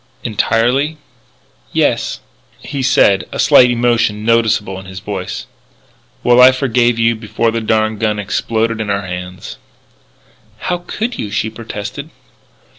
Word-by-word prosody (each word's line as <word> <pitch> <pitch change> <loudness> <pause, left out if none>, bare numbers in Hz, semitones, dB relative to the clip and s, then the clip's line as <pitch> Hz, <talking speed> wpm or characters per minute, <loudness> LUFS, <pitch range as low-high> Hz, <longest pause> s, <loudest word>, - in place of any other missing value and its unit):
"Entirely?" 120 +8 +1 0.8
"Yes." - - 0 0.4
He 140 -1 -5
said, 100 -6 +3
a - - -5
slight 125 - +6
emotion 115 -3 +1
noticeable 110 -4 +1
in 95 - -12
his 95 0 -9
voice: 100 -2 -5 0.8
"Well, 120 0 +5
I 130 +1 +9
forgave 125 -3 +1
you 115 0 +3
before 110 +1 -1
the 115 0 -2
darned 110 -1 0
gun 110 -2 0
exploded 110 +2 -1
in 105 - -4
our 100 0 -1
hands." 90 -6 -7 1.0
"How 180 -1 -1
could 225 +7 -4
you?" 105 - -3
she 110 +1 -2
protested. 110 -2 -7
110 Hz, 130 wpm, -16 LUFS, 105-120 Hz, 1.0 s, I